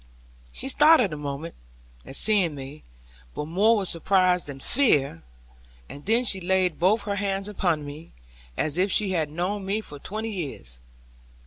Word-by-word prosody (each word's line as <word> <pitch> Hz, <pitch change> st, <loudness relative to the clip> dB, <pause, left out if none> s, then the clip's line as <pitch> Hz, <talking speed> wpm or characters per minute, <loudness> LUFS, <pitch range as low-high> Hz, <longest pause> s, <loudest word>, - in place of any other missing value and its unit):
She -, -, -3 dB
started 275 Hz, -, +5 dB
a -, -, -3 dB
moment, 145 Hz, +2 st, -5 dB, 0.5 s
at -, -, -7 dB
seeing 190 Hz, -7 st, +1 dB
me, 140 Hz, +2 st, -9 dB, 0.5 s
but -, -, -3 dB
more 205 Hz, +8 st, +3 dB
with 195 Hz, -2 st, -1 dB
surprise 180 Hz, +1 st, +2 dB
than 140 Hz, -2 st, -7 dB
fear; 140 Hz, -, +1 dB, 0.7 s
and 145 Hz, -, -10 dB
then 230 Hz, +3 st, +4 dB
she 190 Hz, -6 st, +2 dB
laid 185 Hz, -2 st, +1 dB
both 200 Hz, +5 st, +3 dB
her 200 Hz, -1 st, -3 dB
hands 195 Hz, -1 st, -2 dB
upon 175 Hz, -7 st, -1 dB
mine, 150 Hz, +3 st, -10 dB, 0.5 s
as 155 Hz, +3 st, 0 dB
if 190 Hz, +2 st, +2 dB
she 205 Hz, -3 st, +2 dB
had 160 Hz, -5 st, 0 dB
known 180 Hz, +6 st, -3 dB
me 200 Hz, +3 st, -1 dB
for 145 Hz, -9 st, -9 dB
twenty 215 Hz, +7 st, -5 dB
years. 135 Hz, -, -6 dB
185 Hz, 160 wpm, -25 LUFS, 150-205 Hz, 0.7 s, started